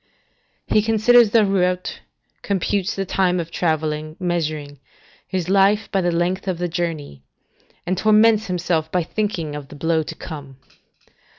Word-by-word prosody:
["He 215 - +3
considers 225 +1 +5
the 220 0 +4
route, 185 -2 0 0.4
computes 200 0 -1
the 195 - -2
time 180 -1 +1
of 170 -1 -5
travelling, 155 -2 -1
measuring 155 -5 -3 0.5
his 185 -3 -3
life 200 +3 +3
by 195 - +1
the 175 -1 +1
length 180 +3 -1
of 185 -2 -1
the 175 +1 -2
journey; 165 - -4 0.6
and 185 - 0
torments 215 +2 +4
himself 175 -3 -1
by 180 -1 +1
thinking 170 -5 -3
of 145 -2 -7
the 145 - -12
blow 160 +2 +1
to 155 - -7
come." 140 -4 -9
180 Hz, 150 wpm, -21 LUFS, 160-195 Hz, 0.6 s, considers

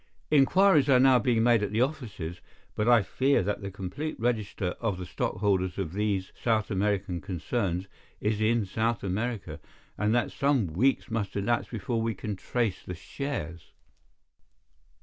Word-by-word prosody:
"Inquiries 150 +1 +5
are 130 -2 +6
now 130 -1 +6
being 115 0 +2
made 120 -2 +4
at 105 - -2
the 110 +2 +1
offices, 110 - -5 0.3
but 105 +3 0
I 120 -4 +6
fear 135 +3 +2
that 100 +2 -2
the 100 - -4
complete 100 +11 -5
register 110 -5 -1
of 110 -6 -1
the 90 - -6
stockholders 95 0 -1
of 90 -4 -3
these 100 -2 -1
South 110 -2 +1
American 100 -3 0
concerns 95 +1 -2 0.3
is 105 0 -1
in 110 0 +2
South 110 +4 -1
America, 105 +2 -3 0.4
and 105 +1 +2
that 120 - +1
some 140 -5 +2
weeks 115 - +1
must 105 -4 -2
elapse 100 +4 0
before 115 0 -2
we 115 -1 -1
can 105 +2 -4
trace 110 0 -1
the 90 - -6
shares." 85 - -6
110 Hz, 155 wpm, -28 LUFS, 95-120 Hz, 0.4 s, are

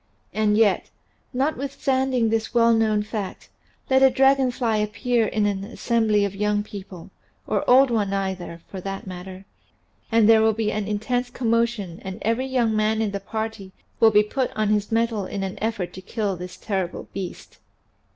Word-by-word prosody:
And 210 -1 +2
yet, 215 -4 +3 0.4
notwithstanding 265 -3 0
this 225 +1 -1
well 230 0 +5
known 215 -2 +2
fact, 210 -2 -6 0.4
let 265 0 +4
a 265 - +8
dragon 270 0 +4
fly 235 -3 0
appear 215 +2 0
in 215 -1 0
an 200 -1 -1
assembly 220 -1 +1
of 200 - -3
young 210 +1 0
people 195 -4 -10 0.3
(or - - 0
old 260 +1 +6
ones 210 -4 0
either, 190 -4 -3
for 190 - -7
that 195 +1 -5
matter) 185 +1 -8 0.7
and 225 -2 +5
there 225 -1 +7
will 220 0 +4
be 215 0 -1
an 210 -1 -2
intense 245 +4 -1
commotion 230 -7 -1
and 190 0 -6
every 230 +4 0
young 240 -4 +1
man 215 +1 +1
in 220 -2 0
the 200 - -3
party 220 -2 -5 0.3
will 225 - +7
be 210 -1 +5
put 255 +4 -1
on 215 -1 +1
his 210 0 0
mettle 225 -3 0
in 195 - -4
an 190 -1 -5
effort 215 -5 -2
to 185 - -9
kill 205 0 -2
the 180 +1 -6
terrible 185 -1 -4
beast. 190 -3 -7
215 Hz, 175 wpm, -23 LUFS, 200-230 Hz, 0.7 s, a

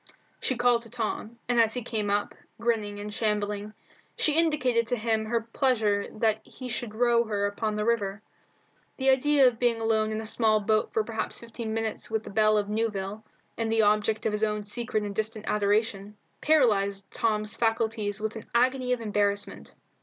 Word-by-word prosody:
She 260 - -1
called 245 -1 +3
to 230 - -13
Tom, 230 -1 -4
and 240 -1 +4
as 225 0 +2
he 250 - -3
came 215 -3 -2
up, 205 0 0 0.3
grinning 215 -3 -1
and 210 0 -6
shambling, 210 -1 -2 0.4
she 310 - +2
indicated 260 -8 +2
to 245 - +1
him 220 -1 0
her 230 +1 0
pleasure 225 -4 +1
that 220 0 +1
he 255 -1 -9
should 220 -2 -4
row 235 0 +3
her 205 -2 -1
upon 210 +1 -2
the 210 0 -1
river. 210 -3 0 0.7
The 265 0 +3
idea 275 +1 +4
of 240 -2 0
being 240 -2 +2
alone 220 -1 +1
in 215 - -2
a 220 - -5
small 220 -1 +3
boat 215 +1 +1
for 220 - +1
perhaps 220 0 -3
fifteen 230 -1 -6
minutes 225 -1 -2
with 220 -1 -1
the - - -9
belle 215 +1 +4
of 205 -1 0
Newville, 210 -1 -2 0.4
and 225 -1 0
the 225 -1 +3
object 215 +1 +2
of 220 - +2
his 210 +1 -1
own 210 -1 0
secret 220 +1 -2
and 205 -1 -4
distant 220 +1 -3
adoration, 205 0 0 0.2
paralysed 200 -10 +2
Tom's 215 -1 +1
faculties 225 -2 0
with 220 +1 -3
an 220 - -8
agony 250 +1 +2
of 245 - -3
embarrassment. 205 -2 -1
220 Hz, 185 wpm, -27 LUFS, 210-235 Hz, 0.7 s, and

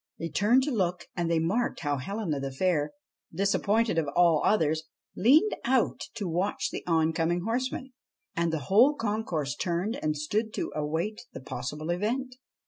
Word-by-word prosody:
They 165 - -4
turned 230 +10 +3
to 295 - -1
look 180 -6 -1
and 175 -2 -1
they 165 - +2
marked 195 +10 0
how 145 -2 0
Helena 170 +1 -3
the 135 0 -4
Fair, 150 +1 0 0.4
disappointed 200 0 +1
of 155 - -1
all 170 -3 +5
others, 160 -6 +2 0.3
leaned 295 - +5
out 255 0 +1
to 205 - -3
watch 180 +4 -1
the - - -4
oncoming 165 +1 +1
horseman. 255 +5 -2 0.4
And 170 0 +1
the 160 -2 -2
whole 245 +10 +5
concourse 205 - -2
turned 180 +5 -1
and 155 0 0
stood 215 +9 -1
to - - -3
await 160 +8 -2
the - - -7
possible 150 +6 -4
event. 250 +8 -2
175 Hz, 160 wpm, -28 LUFS, 160-220 Hz, 0.4 s, all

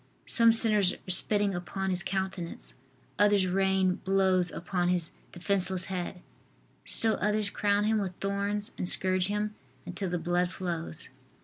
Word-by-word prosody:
Some 230 0 +5
sinners 215 -4 +5
are 185 - -6
spitting 205 +2 +4
upon 190 +2 -3
His 180 -1 -1
countenance, 190 -2 -4 0.5
others 205 -2 +4
rain 190 0 +1
blows 190 -2 +2
upon 175 0 -2
His 175 -2 -1 0.2
defenceless 185 0 -1
head; 180 0 -5 0.6
still 225 -1 0
others 210 -1 0
crown 205 0 +1
Him 215 0 +1
with 190 -3 -4
thorns 200 +2 -1
and 180 - +2
scourge 185 -1 +2
Him 210 +1 -2 0.3
until 180 +2 -4
the 175 - -1
blood 175 +1 0
flows. 170 -4 -5
190 Hz, 140 wpm, -28 LUFS, 180-205 Hz, 0.6 s, Some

